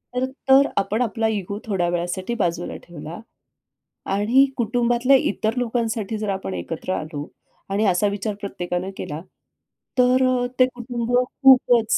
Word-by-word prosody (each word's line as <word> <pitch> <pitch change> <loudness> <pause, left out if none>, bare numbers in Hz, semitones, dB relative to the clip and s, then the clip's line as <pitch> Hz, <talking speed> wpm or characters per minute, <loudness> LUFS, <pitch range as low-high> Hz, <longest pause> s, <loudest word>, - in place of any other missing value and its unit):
तर 255 - +1 0.2
तो 270 +1 +8 0.2
आपण 210 +4 0
आपला 225 -1 0
इगो 205 -1 -3
थोड्या 190 -5 0
वेळासाठी 175 +5 -2
बाजूला 175 0 -2
ठेवला. 170 +1 -9 0.9
आणि 220 +8 +3
कुटुंबातल्या 240 +2 +2
इतर 220 0 -1
लोकांसाठी 225 -3 -1
जर 210 -1 -3
आपण 190 - -3
एकत्र 90 - -4
आलो. 150 -2 -4 0.4
आणि 200 +3 +1
असा 190 +1 +3
विचार 200 +1 -3
प्रत्येकानं 180 -2 -3
केला 150 +2 -5 0.8
तर 255 0 +3
ते 255 - +8
कुटुंब 240 -1 -4 0.3
खूपच 245 -4 +6
215 Hz, 130 wpm, -22 LUFS, 185-245 Hz, 0.9 s, तो